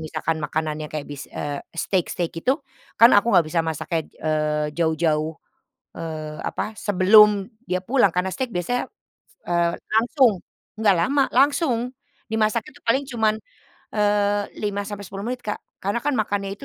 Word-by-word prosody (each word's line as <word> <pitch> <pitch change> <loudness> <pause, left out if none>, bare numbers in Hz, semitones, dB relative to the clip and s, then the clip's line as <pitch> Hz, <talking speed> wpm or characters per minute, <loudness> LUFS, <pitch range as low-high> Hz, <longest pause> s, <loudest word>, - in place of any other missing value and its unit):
misalkan 160 0 -2
makanannya 155 0 -2
kayak 155 -2 -3
bis 145 -1 -8
eee, 145 -1 -4 0.2
steak-steak 175 -1 -1
gitu, 260 - 0 0.4
kan 230 +1 +9
aku 205 - +4
nggak 170 - +6
bisa 165 +1 +1
masaknya, 160 +1 -2
eee, 150 -1 -1
jauh-jauh, 160 -1 +1 0.6
eee, 155 -2 -5
apa, 215 - -4
sebelum 205 0 +6 0.2
dia 185 0 0
pulang, 245 -2 +4
karena 180 +1 0
steak 260 +3 -2
biasanya, 180 +8 -1
s - - -53 0.4
eee, 170 -1 +2 0.2
langsung. 240 +2 +4 0.5
Nggak 205 -3 +4
lama, 275 +10 +3
langsung! 275 -1 +3 0.5
Dimasak 220 +1 +1
itu 290 - -18
paling 265 +5 +3
cuman, 220 -2 +2 0.6
eee, 205 -1 +2 0.2
5-10 200 -1 -4
menit, 250 0 -4
Kak, 210 - -2 0.2
karena 200 +4 0
kan 290 - +1
makannya 205 -2 -1
itu. - - -10
200 Hz, 145 wpm, -23 LUFS, 160-220 Hz, 0.6 s, kan